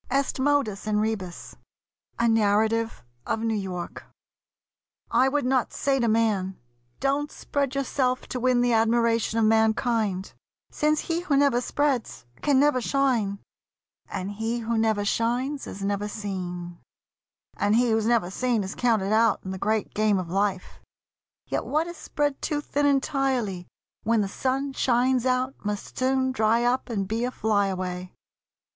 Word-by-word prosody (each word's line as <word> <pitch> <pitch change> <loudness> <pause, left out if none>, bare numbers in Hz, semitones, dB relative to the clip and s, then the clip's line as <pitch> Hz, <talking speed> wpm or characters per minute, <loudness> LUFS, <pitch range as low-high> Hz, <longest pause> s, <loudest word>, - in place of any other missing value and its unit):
EST 275 +1 0
MODUS 260 -8 +1
IN 210 -1 +1
REBUS 210 -5 -3 0.6
A 235 - +2
NARRATIVE 220 - +2 0.2
OF - - 0
NEW 225 0 0
YORK 185 -4 -5 1.1
I 255 +3 +4
would 285 -1 0
not 255 -1 +1
say 275 -1 +1
to 235 - +1
man, 215 -4 +1 0.4
"Don't 280 +2 0
spread 280 -2 -2
yourself 255 -2 0
To 250 - -3
win 250 0 +3
the 245 -1 +2
admiration 230 0 +2
of 225 - +3
mankind," 220 -3 +1 0.4
Since 305 0 +1
he 335 0 -1
who 305 -6 +1
never 275 -4 +3
spreads 270 - -1 0.2
can 280 -3 +3
never 285 -3 +3
shine, 240 -7 +1 0.7
And 190 +2 -4
he 225 +3 -2
who 230 +1 -1
never 220 -2 +1
shines 245 +6 -1
is 195 - -7
never 205 +1 -1
seen, 180 -4 -5 0.8
And 205 +1 +2
he 240 0 +3
who's 220 0 +1
never 230 -7 +2
seen 240 0 0
is 190 - -5
counted 215 -5 +1
out 225 0 +3
In 190 - -4
the 190 - -5
great 215 +2 -1
game 215 -1 +2
of 180 -2 -4
life; 195 -1 -1 0.6
yet - - -2
what 310 +2 0
is 345 0 -7
spread 290 -2 -2
Too 300 -3 -1
thin 290 0 0
entirely, 265 -9 0 0.3
when 225 0 +2
the 200 - 0
sun 270 +6 -2
shines 255 0 +2
out 255 +1 +1
Must 210 0 -4
soon 260 0 +1
dry 230 -1 +2
up 250 +1 0
and 200 -4 -2
be 225 +3 -1
a 250 - 0
fly 210 -5 +1
away. 180 -1 -4
230 Hz, 155 wpm, -26 LUFS, 205-260 Hz, 1.1 s, I